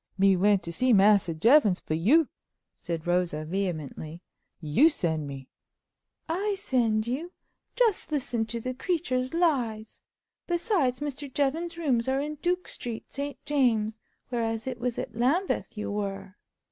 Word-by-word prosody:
"Me 195 Hz, 0 st, +5 dB
went 195 Hz, 0 st, +3 dB
to 170 Hz, -, -5 dB
see 255 Hz, +8 st, +2 dB
Massa 200 Hz, -3 st, +5 dB
Jevons 210 Hz, -, +4 dB
for -, -, -4 dB
you," 255 Hz, -, +4 dB, 0.5 s
said 165 Hz, -1 st, -5 dB
Rosa 175 Hz, -3 st, 0 dB
vehemently; 165 Hz, -2 st, -4 dB, 0.4 s
"you 165 Hz, -, +4 dB
send 160 Hz, -, -2 dB
me." 135 Hz, -1 st, -8 dB, 0.8 s
"I 395 Hz, +5 st, -1 dB
send 235 Hz, -, +1 dB
you! 290 Hz, +9 st, -4 dB, 0.4 s
Just 460 Hz, -9 st, +1 dB
listen 245 Hz, -6 st, -1 dB
to 235 Hz, +1 st, -4 dB
the 255 Hz, +3 st, -3 dB
creature's 260 Hz, -3 st, -1 dB
lies! 245 Hz, -11 st, 0 dB, 0.5 s
Besides, 340 Hz, -, +1 dB
Mr. 285 Hz, -1 st, -4 dB
Jevons's 320 Hz, +5 st, -1 dB
rooms 265 Hz, -8 st, +1 dB
are 265 Hz, +1 st, +1 dB
in 295 Hz, +2 st, -3 dB
Duke 360 Hz, +1 st, 0 dB
Street, 235 Hz, -2 st, -6 dB
St 280 Hz, 0 st, -4 dB
James's, 225 Hz, -7 st, +1 dB, 0.3 s
whereas 225 Hz, -2 st, -2 dB
it 255 Hz, -2 st, -4 dB
was 240 Hz, 0 st, -2 dB
at -, -, -5 dB
Lambeth 265 Hz, -, 0 dB
you 210 Hz, -, -3 dB
were." 195 Hz, -2 st, -4 dB
240 Hz, 145 wpm, -27 LUFS, 195-290 Hz, 0.8 s, Me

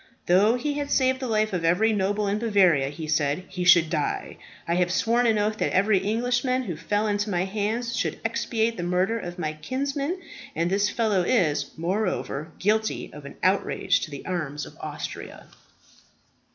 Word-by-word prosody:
"Though 200 Hz, +6 st, +4 dB
he 290 Hz, +4 st, -2 dB
had 285 Hz, 0 st, -3 dB
saved 260 Hz, -2 st, +2 dB
the 260 Hz, -, -3 dB
life 215 Hz, -2 st, +1 dB
of 175 Hz, -2 st, -1 dB
every 190 Hz, +7 st, +3 dB
noble 205 Hz, +1 st, 0 dB
in 205 Hz, +2 st, 0 dB
Bavaria," 185 Hz, -11 st, +3 dB
he 155 Hz, +2 st, -7 dB
said, 150 Hz, +2 st, 0 dB
"he 185 Hz, -1 st, -4 dB
should 175 Hz, -2 st, +6 dB
die. 155 Hz, -4 st, -2 dB, 0.3 s
I 170 Hz, -, +1 dB
have 175 Hz, 0 st, +1 dB
sworn 235 Hz, +5 st, +2 dB
an 220 Hz, -2 st, +3 dB
oath 210 Hz, +1 st, 0 dB
that -, -, 0 dB
every 195 Hz, +1 st, +3 dB
Englishman 245 Hz, +5 st, 0 dB
who 180 Hz, -8 st, -4 dB
fell 205 Hz, +7 st, -1 dB
into 205 Hz, 0 st, 0 dB
my 180 Hz, -1 st, 0 dB
hands 220 Hz, +4 st, -2 dB
should -, -, -2 dB
expiate 230 Hz, 0 st, 0 dB
the -, -, -3 dB
murder 180 Hz, +6 st, 0 dB
of 175 Hz, -3 st, -7 dB
my 155 Hz, -3 st, -2 dB
kinsman; 280 Hz, -, -3 dB, 0.4 s
and 170 Hz, +2 st, 0 dB
this 200 Hz, +1 st, +2 dB
fellow 215 Hz, -5 st, +1 dB
is, 175 Hz, -7 st, +1 dB
moreover, 170 Hz, -4 st, -2 dB
guilty 220 Hz, +2 st, 0 dB
of 150 Hz, -1 st, -10 dB
an 140 Hz, -, -9 dB
outrage 190 Hz, +2 st, +2 dB
to -, -, -5 dB
the 140 Hz, -2 st, -8 dB
arms 150 Hz, -5 st, -3 dB
of -, -, -13 dB
Austria." -, -, -7 dB
200 Hz, 180 wpm, -25 LUFS, 175-225 Hz, 0.4 s, should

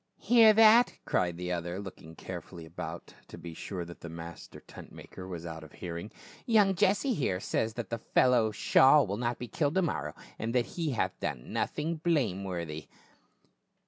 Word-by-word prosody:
" -, -, -50 dB
Hear 230 Hz, -2 st, +6 dB
that," 225 Hz, +2 st, +6 dB
cried 85 Hz, -2 st, 0 dB
the 90 Hz, 0 st, -4 dB
other, 85 Hz, +1 st, -3 dB
looking 90 Hz, -5 st, -10 dB
carefully 85 Hz, -2 st, -8 dB
about 80 Hz, -, -8 dB
to -, -, -11 dB
be 85 Hz, -1 st, -8 dB
sure 90 Hz, +1 st, -5 dB
that 85 Hz, 0 st, -11 dB
the 85 Hz, -, -7 dB
master 85 Hz, 0 st, -9 dB
tent -, -, -13 dB
maker 90 Hz, -, -10 dB
was 85 Hz, -2 st, -7 dB
out 80 Hz, -1 st, -7 dB
of 80 Hz, -, -14 dB
hearing. 85 Hz, +3 st, -6 dB, 0.2 s
" -, -, -18 dB
Young 210 Hz, -4 st, +4 dB
Jesse, 200 Hz, +9 st, +2 dB
here, 110 Hz, -, -1 dB
says 110 Hz, +3 st, -1 dB
that 120 Hz, -1 st, -5 dB
the 115 Hz, -, -2 dB
fellow 120 Hz, -1 st, +3 dB
Shaul 135 Hz, +7 st, +5 dB
will 100 Hz, +2 st, -3 dB
not 120 Hz, 0 st, -1 dB
be 125 Hz, -, -6 dB
killed 150 Hz, +4 st, -1 dB
to 190 Hz, -, +3 dB
morrow, 75 Hz, -, -3 dB, 0.2 s
and 115 Hz, +2 st, -3 dB
that 125 Hz, -1 st, +3 dB
he 165 Hz, -3 st, -3 dB
hath 115 Hz, -, -2 dB
done -, -, -4 dB
nothing 160 Hz, +2 st, -2 dB
blameworthy 95 Hz, -, -2 dB
100 Hz, 185 wpm, -30 LUFS, -, 0.2 s, Hear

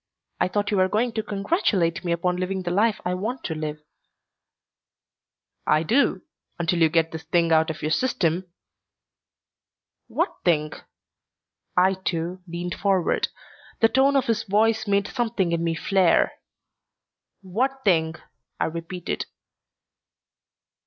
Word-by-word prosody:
I -, -, +3 dB
thought 205 Hz, +2 st, -1 dB
you 205 Hz, -, +1 dB
were 185 Hz, 0 st, +4 dB
going 235 Hz, +4 st, +1 dB
to 220 Hz, -, -2 dB
congratulate 195 Hz, -, 0 dB
me 175 Hz, -, -1 dB
upon 180 Hz, +1 st, 0 dB
living 185 Hz, +1 st, -2 dB
the 175 Hz, -, -2 dB
life 210 Hz, +4 st, +2 dB
I 180 Hz, -, 0 dB
want 225 Hz, +8 st, -3 dB
to 160 Hz, -, -2 dB
live." 155 Hz, -1 st, -5 dB, 1.8 s
"I 155 Hz, +1 st, +3 dB
do. 240 Hz, -, +2 dB, 0.3 s
Until 170 Hz, 0 st, 0 dB
you 160 Hz, -, +6 dB
get 165 Hz, 0 st, +2 dB
this 160 Hz, -, -6 dB
thing 170 Hz, 0 st, +1 dB
out 160 Hz, 0 st, +4 dB
of 160 Hz, -, -5 dB
your 155 Hz, -, 0 dB
system 180 Hz, -5 st, 0 dB, 0.8 s
" -, -, -67 dB
"What -, -, -1 dB
thing?" 155 Hz, -3 st, +2 dB, 1.1 s
I, 185 Hz, +1 st, +5 dB
too, 180 Hz, -1 st, -3 dB
leaned 175 Hz, +1 st, -4 dB
forward. 195 Hz, -4 st, +1 dB, 0.5 s
The 225 Hz, -, +5 dB
tone 270 Hz, +3 st, +3 dB
of 270 Hz, -, +3 dB
his 225 Hz, -1 st, +1 dB
voice 220 Hz, +2 st, +1 dB
made 200 Hz, 0 st, +2 dB
something 225 Hz, -8 st, -1 dB
in 170 Hz, 0 st, 0 dB
me 165 Hz, -1 st, 0 dB
flare. 185 Hz, +1 st, +3 dB, 1.1 s
"What 260 Hz, +8 st, -1 dB
thing?" 160 Hz, -4 st, +3 dB, 0.4 s
I -, -, +2 dB
repeated. 170 Hz, +2 st, -4 dB
185 Hz, 140 wpm, -24 LUFS, 165-210 Hz, 1.8 s, you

